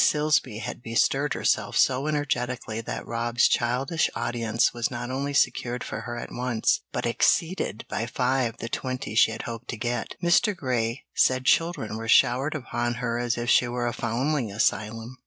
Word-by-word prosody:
Silsby 150 -7 +2
had 115 - -6
bestirred 135 +5 +1
herself - - 0
so 130 +3 +3
energetically 125 -6 -2
that - - -5
Rob's 120 0 +1
childish 130 +7 +1
audience 115 -1 0
was 120 -1 -1
not 120 0 -5
only 140 +2 -2
secured 125 -3 +1
for - - -5
her 120 +1 -6
at - - -7
once, 120 -2 0
but - - -2
exceeded 165 - +1
by 115 - -3
five 125 -2 0
the 115 - -5
twenty 130 -2 -4
she 110 - +5
had 110 0 -5
hoped 115 -1 -7
to 120 - -4
get. 120 +1 -3
Mr. 180 +5 +3
Grey 120 -4 -2
said 130 0 +2
children 165 -11 +1
were 115 0 -6
showered 130 +6 +4
upon 120 -3 -2
her 120 0 -2
as 120 -1 -1
if 120 0 -3
she 125 - +5
were 120 0 -2
a 120 - -1
foundling 120 +1 -1
asylum. 110 +4 -1
120 Hz, 175 wpm, -26 LUFS, 115-130 Hz, -, she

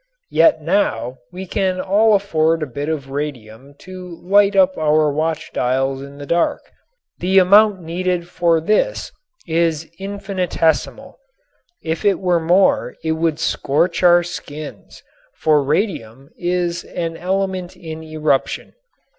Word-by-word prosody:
Yet 305 - +4
now 125 - 0
we 185 +1 -7
can 185 0 -1
all 210 +3 +3
afford 165 -5 +1
a - - -1
bit 145 +3 -5
of 140 -4 -4
radium 135 -2 -6
to 180 -2 -10
light 200 +2 +4
up 190 -1 +4
our 155 -1 +2
watch 160 +1 -2
dials 135 +2 0
in 140 +1 -10
the 145 - -8
dark. 170 +4 -1 0.5
The 190 +2 +1
amount 200 +1 +5
needed 175 +1 -2
for 170 -2 +1
this 215 - 0 0.3
is 165 -1 0
infinitesimal. 195 - -2 0.6
If 160 0 -3
it 200 -2 +2
were 180 -2 +1
more 175 +4 +2
it 160 - 0
would 160 -1 0
scorch 165 +6 0
our 175 -1 +5
skins, 155 -3 -9 0.3
for 155 -2 +2
radium 140 - -2
is 175 -1 -2
an 165 -1 -4
element 185 0 -2
in 160 -1 -8
eruption. 155 -3 -1
165 Hz, 130 wpm, -19 LUFS, 150-185 Hz, 0.6 s, amount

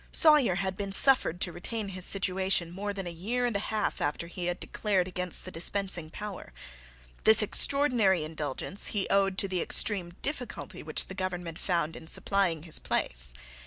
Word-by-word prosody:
Sawyer 300 - +6
had 190 0 -3
been 200 0 -5
suffered 195 -5 +4
to 175 - 0
retain 205 +4 -6
his 185 -1 -1
situation 190 -3 +2
more 200 +3 -5
than 195 -2 -6
a 175 - -5
year 225 +9 -3
and 240 -3 -2
a - - 0
half 215 0 -3
after 145 +3 -2
he 175 +1 -6
had 175 0 -3
declared 195 -4 -2
against 180 -1 -3
the - - -8
dispensing 175 -1 -1
power. 200 - -9 0.7
This 220 0 +9
extraordinary 225 - +2
indulgence 155 +4 +1
he 195 - -1
owed 195 -1 +1
to 195 - +1
the 185 -2 -3
extreme 180 -5 +1
difficulty 275 -4 -5
which - - -1
the - - -10
government 180 -3 -5
found 170 -3 -2
in 160 - -11
supplying 180 -4 -1
his 165 -2 -1
place. - - 0
190 Hz, 175 wpm, -28 LUFS, 175-205 Hz, 0.7 s, This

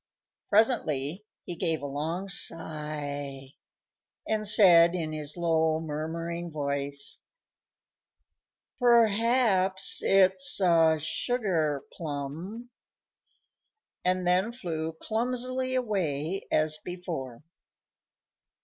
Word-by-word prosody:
Presently 200 - +1 0.2
he 175 - -5
gave 165 -3 -1
a - - -3
long 160 +7 -4
sigh 145 -6 -2 0.8
and 215 -1 0
said, 180 -5 +7
in 160 -3 -3
his 155 +1 -5
low, 160 -2 +1
murmuring 165 +2 -5
voice, 140 -2 -3 1.6
"Perhaps 230 -4 +3
it's 190 -1 +2
a 165 -4 +4
sugar 160 - -1
plum," 165 - -6 1.3
and 185 0 0
then 185 +5 +1
flew 165 -9 -5
clumsily 255 +3 -1
away 190 - -2
as 155 0 0
before. 160 -9 -7
170 Hz, 80 wpm, -27 LUFS, 155-200 Hz, 1.6 s, said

